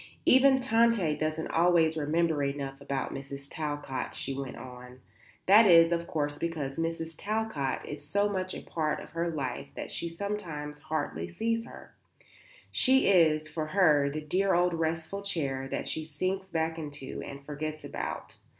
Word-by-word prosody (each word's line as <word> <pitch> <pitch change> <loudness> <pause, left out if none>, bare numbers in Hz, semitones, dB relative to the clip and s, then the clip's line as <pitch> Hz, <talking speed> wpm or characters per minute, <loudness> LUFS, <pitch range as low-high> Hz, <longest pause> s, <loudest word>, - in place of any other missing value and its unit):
"Even 265 +1 +6
Tante 230 -9 +3
doesn't 155 +1 -2
always 165 -2 +4
remember 160 0 +1
enough 140 -1 -3
about 140 -1 -3
Mrs. 140 0 -7
Talcott," 145 -4 -4
she 135 - -4
went 135 -1 -5
on. 125 0 -10 0.5
"That 210 +3 +8
is 165 -2 +7
of 170 0 0
course 145 -1 -2
because 160 -4 -3
Mrs. 165 0 -2
Talcott 205 -10 -2
is 145 0 -7
so 200 +8 +1
much 185 -2 -2
a - - -7
part 155 -2 -1
of - - -11
her 170 +1 -1
life 130 - -3
that - - -6
she 170 - -3
sometimes 165 -6 -5
hardly 150 - -3
sees 230 - -1
her. - - -12 0.8
She 265 -4 +4
is, 155 -5 +4
for 155 0 -3
her, 155 -6 +4
the 155 +2 -4
dear 185 +5 +1
old 175 0 +3
restful 165 +4 -2
chair 140 -9 -2
that - - -3
she 160 - -2
sinks 185 +5 -2
back 160 -1 -1
into 145 -3 -6
and 140 0 -9
forgets 155 +1 -5
about. - - -5
160 Hz, 160 wpm, -29 LUFS, 145-180 Hz, 0.8 s, That